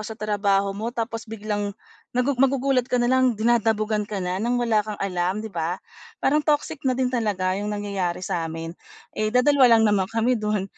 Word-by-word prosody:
sa 220 +1 -7
trabaho 200 -2 +1
mo 215 +4 -4
tapos 230 -1 -4
biglang 205 -2 -3 0.4
nagugu 250 +1 +1
magugulat 270 -1 +2
ka 250 - +1
nalang 250 0 +3
dinadabugan 220 -2 +1
ka 210 - -4
na 180 +2 -2
ng 240 +2 0
wala 230 -3 +2
kang 210 0 -5
alam 185 +2 -2
'di 220 - -7
ba? 170 +2 -2 0.5
Parang 300 +3 +4
toxic 295 -1 0
na 255 - +1
din 255 -1 0
talaga 200 -6 0
yung 205 - -3
nangyayari 200 -4 -2
sa 165 -1 -2
amin. 165 +1 -6 0.4
Eh, 215 0 -1
dadalawa 250 0 +5
lang 225 - +3
naman 200 -3 +2
kami 230 +1 +1
do'n. 210 -2 -1
215 Hz, 185 wpm, -24 LUFS, 200-245 Hz, 0.5 s, dadalawa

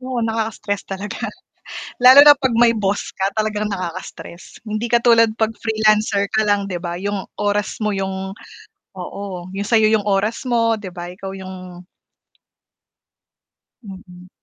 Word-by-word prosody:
Oo, 255 -2 -3
nakaka-stress 220 -2 -2
talaga, 200 +1 -5 0.7
lalo 270 +3 +9
na 290 - +10
'pag 270 -2 -1
may 235 -1 +5
boss 200 -1 -2
ka, 195 +1 -1
talagang 215 -1 -1
nakaka-stress, 180 -1 -7
hindi 215 +2 -3
katulad 235 -1 +4
'pag 220 0 0
freelancer 215 -2 +2
ka 220 - +3
lang 205 -1 +1
'di 180 -2 -5
ba, 175 0 -4
yung 200 0 -3 0.2
oras 205 0 -1
mo, 210 -2 -1
yung 190 0 -4 0.6
oo, 185 -2 -7
yung 200 +1 -4
sayo 220 -2 +4
yung 210 -2 +1
oras 205 +6 0
mo, 230 -2 +1
'di 185 -3 -9
ba, 175 0 -7
ikaw 195 +1 -8
yung 185 -1 -10 2.0
Mm. 185 -3 -12
205 Hz, 140 wpm, -19 LUFS, 190-225 Hz, 2.0 s, na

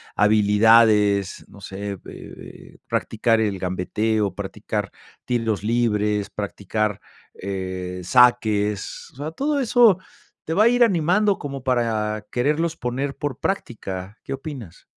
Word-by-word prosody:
habilidades, 105 -1 +4
no 100 - -15
sé, 100 +1 -6
eh, 100 - -5
eh, - - -12
practicar 115 0 +1
el 100 -4 -1
gambeteo, 100 +3 -1
practicar - - -4 0.3
tiros 115 -4 -1
libres, 105 -2 0
practicar, 105 0 -3 0.3
eh, 95 -1 -5
saques, 110 -4 +2
o - - -27
sea, 150 +3 -5
todo 285 - -1
eso 235 -6 +4 0.5
te 160 - -2
va 205 - +4
a 230 - +6
ir 245 0 +5
animando 190 +2 +2
como 140 -2 -6
para 110 -4 0
quererlos 155 +6 0
poner 135 +2 -3
por 145 -3 -4
práctica, 100 - -4
¿qué - - -9
opinas? 135 - -8
110 Hz, 125 wpm, -22 LUFS, 100-140 Hz, 0.5 s, a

